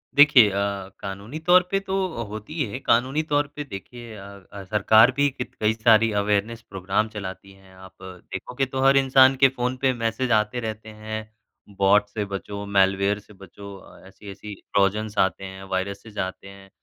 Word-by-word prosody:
देखिए 140 -7 +7
अ, 100 -1 -3
कानूनी 100 +9 -7
तौर 180 +3 +5
पे 195 - +2
तो 195 -1 -4 0.2
अ, 115 - -4
होती 110 +7 -8
ही 155 -3 -1
है, 130 - -5
कानूनी 130 +5 +1
तौर 145 -2 0
पे 150 - -4
देखिए 120 -1 -10
अ 100 - -10 0.3
अ, 100 -1 -9
सरकार 110 +4 +4
भी 145 +1 +2
कित 130 -2 -7
कई 110 +1 +2
सारी 115 0 +4
अवेयरनेस 105 +3 -1
प्रोग्राम 95 +3 -1
चलाती 100 -2 -8
हैं, 95 -1 -20
आप 95 0 -15
देखोगे 95 +7 -5
तो 130 0 -4
हर 135 +1 +5
इंसान 135 0 +5
के - - +10
फ़ोन 125 0 -3
पे 135 -1 +2
मैसेज 120 +1 -2
आते 110 +2 +1
रहते 110 -1 -6
हैं। 110 0 -7 0.5
बॉट 100 +1 +4
से 105 -2 -4
बचो, 100 +1 -6
मैलवेयर 100 0 +2
से 105 - -18
बचो 100 +1 -12
अ, - - -16
ऐसी-ऐसी 100 +1 -10
ट्रोजन्स 105 +2 -1
आते 95 0 +1
हैं, 95 0 -9
वायरसेज़ 100 +3 -5
आते 95 +1 -5
हैं, 95 0 -14
105 Hz, 180 wpm, -23 LUFS, 100-125 Hz, 0.5 s, के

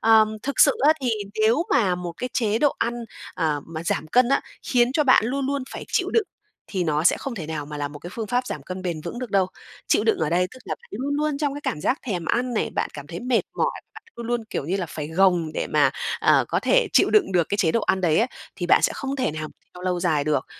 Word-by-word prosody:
Ờm, 220 -1 +4
thực 280 0 -1
sự 280 - +8
á 310 - +8
thì 245 - +1 0.3
nếu 235 +9 +3
mà 190 -6 +3
một 180 -1 -5
cái 250 - -3
chế 220 -2 +1
độ 290 +1 +3
ăn, 235 +1 0 0.4
ờ, 155 -5 0
mà 165 0 -6
giảm 160 - -1
cân 245 +7 +4
á, 275 - +3 0.2
khiến 245 0 +2
cho 300 0 +2
bạn 260 -5 +5
luôn 270 +2 -1
luôn 280 -1 -1
phải - - -7
chịu - - +1
đựng 450 -3 +2 0.4
thì 185 -3 -1
nó 155 0 0
sẽ - - +5
không 270 -3 -5
thể 165 -7 -6
nào 150 -2 -4
mà 150 - -7
là 145 -1 -2
một 145 0 -10
cái 175 - -9
phương 225 -2 -4
pháp 250 +3 0
giảm - - -5
cân 185 0 -6
bền 170 -4 -3
vững 205 +8 -5
được 250 -5 -5
đâu. 195 -2 +3 0.4
Chịu 210 - +2
đựng 225 - +2
ở 155 -1 0
đây 180 +1 +2
tức 255 - -12
là - - -3
bạn - - -22
luôn 270 +7 -2
luôn 300 -1 0
trong 285 -2 -1
cái 290 - -6
cảm 150 - -2
giác 260 - +1
thèm 180 -7 -2
ăn 245 +4 0
này, - - 0
bạn - - -1
cảm 145 -1 -8
thấy 170 +2 -6
mệt 245 -1 +2 0.2
mỏi, - - +2 0.2
bạn - - -11
luôn 235 - -6
luôn, 240 -1 -1
kiểu - - -3
như 185 - 0
là, 180 - -2
phải 150 -1 -6
gồng 175 -2 +2
để - - -1
mà, - - +3 0.3
à, - - +4
có - - 0
thể - - +3
chịu - - +5
đựng 405 - +3
được 175 -3 +2
cái 205 - 0
chế 165 -5 +3
độ 230 - +2
ăn 190 - +1
đấy 165 -4 +3
á, 230 - +3 0.3
thì 175 - -3
bạn - - +5
sẽ - - +3
không 275 0 -4
thể 255 - 0
nào 155 0 -5 0.3
theo 180 - -10
lâu 180 -1 -1
dài 155 -5 +1
được. 150 -3 0
200 Hz, 280 wpm, -24 LUFS, 165-250 Hz, 0.4 s, sự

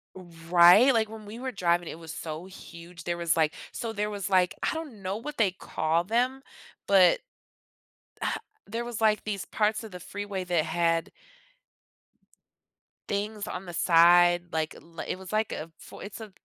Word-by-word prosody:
Right, 175 +6 +5
like, 220 -2 +1
when 220 -1 -10
we 215 +3 -9
were 260 0 -4
driving, 175 -2 +1
it - - -6
was 165 -1 -9
so 155 +2 -6
huge, 175 -2 -12
there 175 - -1
was, 170 -1 +1
like 155 -1 +2 0.2
so 230 -1 -4
there 210 0 -1
was, 205 -2 -4
I 185 -2 +4 0.3
don't 300 -10 -7
know 190 +1 -3
what 290 +7 -6
they 210 -5 +3
call 165 -2 -1
them, 245 +7 0 0.5
but, 190 -3 +6 1.5
there 230 +3 -4
was, 240 -2 -5
like, 215 -1 +2
these 200 -3 -3
parts 215 +1 0
of 220 - -9
the 180 - -7
freeway 200 +1 -5
that 175 -3 +1
had 165 0 0 2.0
things 205 +1 -3
on 180 +1 -5
the 175 - -8
side, 175 +1 +5
like, 160 -1 -2 0.3
it - - -3
was 190 -1 -10
like 215 0 +1
a 155 - -5 0.3
it's 205 +3 -8
a 215 -2 -9
190 Hz, 165 wpm, -27 LUFS, 170-215 Hz, 2.0 s, but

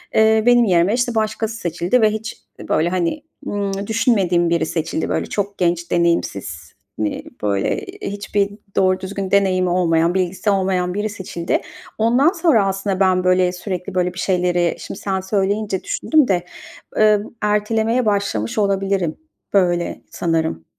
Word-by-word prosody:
Eee, 220 0 +4
benim 240 -1 +5
yerime, 180 +1 +3
işte, 245 -1 0
başkası 220 0 -1
seçildi 175 +5 0
ve 215 - +5
hiç, 220 0 -6 0.3
böyle, 160 +2 +2
hani, 185 - -1 0.2
ımm, 200 -1 -3
düşünmediğim 195 -7 +2
biri 170 -1 +1
seçildi. 160 0 -2
Böyle, - - -1
çok 200 -1 -3
genç, 170 -1 0
deneyimsiz, 100 - -1 0.3
hani, 105 -1 -2 0.2
böyle, 100 - 0 0.2
hiçbir 205 - -1 0.3
doğru 185 0 +3
düzgün 195 0 -5
deneyimi 185 -2 +3
olmayan, 170 -1 +2
bilgisi 190 +2 -1
olmayan 185 -2 +1
biri 210 +2 -2
seçildi. 185 -4 -3 0.4
Ondan 245 +9 +3
sonra 325 - +3
aslında 195 0 -2
ben, 185 -1 +3
böyle, 185 0 +3
sürekli 180 0 -5
böyle 180 -1 +1
bir 180 - -8
şeyleri, 180 -2 +1
şimdi - - -7
sen 190 -1 -1
söyleyince 195 0 -1
düşündüm 305 -4 +2
de, 180 -3 0 0.5
eee, 215 -1 +5 0.2
ertelemeye 220 +3 +1
başlamış 200 - -1
olabilirim 195 -4 0 0.4
böyle 175 -3 +1
sanırım. 160 - -1
190 Hz, 140 wpm, -20 LUFS, 175-210 Hz, 0.5 s, benim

